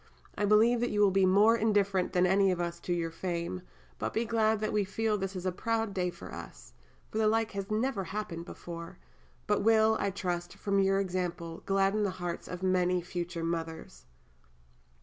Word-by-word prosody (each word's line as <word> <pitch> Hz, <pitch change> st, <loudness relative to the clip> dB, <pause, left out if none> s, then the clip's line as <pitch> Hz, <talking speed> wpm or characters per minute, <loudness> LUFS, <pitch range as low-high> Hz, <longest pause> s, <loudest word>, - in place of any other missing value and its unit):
I 205 Hz, -, 0 dB
believe 220 Hz, +4 st, +5 dB
that 240 Hz, +1 st, 0 dB
you 205 Hz, -, -1 dB
will 205 Hz, -2 st, +5 dB
be 190 Hz, 0 st, +4 dB
more 205 Hz, +5 st, +5 dB
indifferent 205 Hz, -4 st, +1 dB
than 180 Hz, 0 st, +4 dB
any 195 Hz, +1 st, +4 dB
of 180 Hz, -, -2 dB
us 170 Hz, 0 st, -3 dB
to 175 Hz, -, -5 dB
your 170 Hz, -1 st, -1 dB
fame, 170 Hz, +1 st, -3 dB, 0.4 s
but -, -, -2 dB
be 230 Hz, -, +1 dB
glad 220 Hz, -1 st, +2 dB
that 215 Hz, -, -2 dB
we 210 Hz, -1 st, +2 dB
feel 215 Hz, +2 st, -1 dB
this 195 Hz, -1 st, -3 dB
is 185 Hz, 0 st, -5 dB
a 185 Hz, -, +1 dB
proud 225 Hz, +2 st, -1 dB
day 180 Hz, -2 st, 0 dB
for 175 Hz, -, -10 dB
us; -, -, -10 dB, 0.4 s
for 215 Hz, -, -2 dB
the 220 Hz, -, +3 dB
like 225 Hz, +1 st, +1 dB
has 195 Hz, -1 st, -5 dB
never 215 Hz, -2 st, 0 dB
happened 185 Hz, -3 st, -5 dB
before, 170 Hz, -1 st, -8 dB, 0.5 s
but -, -, +1 dB
will, 220 Hz, 0 st, +4 dB
I 200 Hz, -, +1 dB
trust, 175 Hz, -2 st, -3 dB
from 200 Hz, -1 st, 0 dB
your 195 Hz, 0 st, +3 dB
example, 175 Hz, -3 st, -3 dB
gladden 195 Hz, +2 st, +2 dB
the 205 Hz, -, +1 dB
hearts 175 Hz, -1 st, -4 dB
of 180 Hz, +1 st, -6 dB
many 180 Hz, -1 st, +2 dB
future 175 Hz, -1 st, -4 dB
mothers. 160 Hz, -, -5 dB
195 Hz, 195 wpm, -30 LUFS, 175-215 Hz, 0.5 s, believe